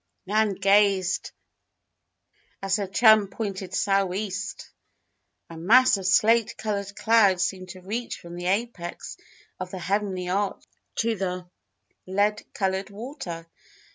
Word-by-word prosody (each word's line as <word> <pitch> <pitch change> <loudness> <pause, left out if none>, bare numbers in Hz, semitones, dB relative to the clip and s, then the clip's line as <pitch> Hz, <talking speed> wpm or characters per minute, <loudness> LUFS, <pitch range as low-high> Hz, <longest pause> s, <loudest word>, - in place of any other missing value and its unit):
Nan 210 +1 +1
gazed 195 -1 +2 1.3
as 195 +1 +1
her 200 -2 -3
chum 215 +1 +5
pointed 195 -2 -5
"sou'east." 195 +1 -1 0.8
A 165 - -11
mass 225 +11 +5
of 190 -1 -3
slate 225 +3 +3
colored 200 -2 -3
clouds 200 -5 +4
seemed 185 -1 -3
to 185 +1 -10
reach 225 +6 -4
from 170 0 -10
the 175 0 -4
apex 195 -3 -3 0.4
of 185 -1 -5
the 190 - -6
heavenly 185 0 -2
arch 195 +2 -1 0.3
to 230 0 +1
the 180 -2 -4 0.6
lead 205 +3 +1
colored 190 0 -1
water. 200 - -7
195 Hz, 120 wpm, -25 LUFS, 185-210 Hz, 1.3 s, chum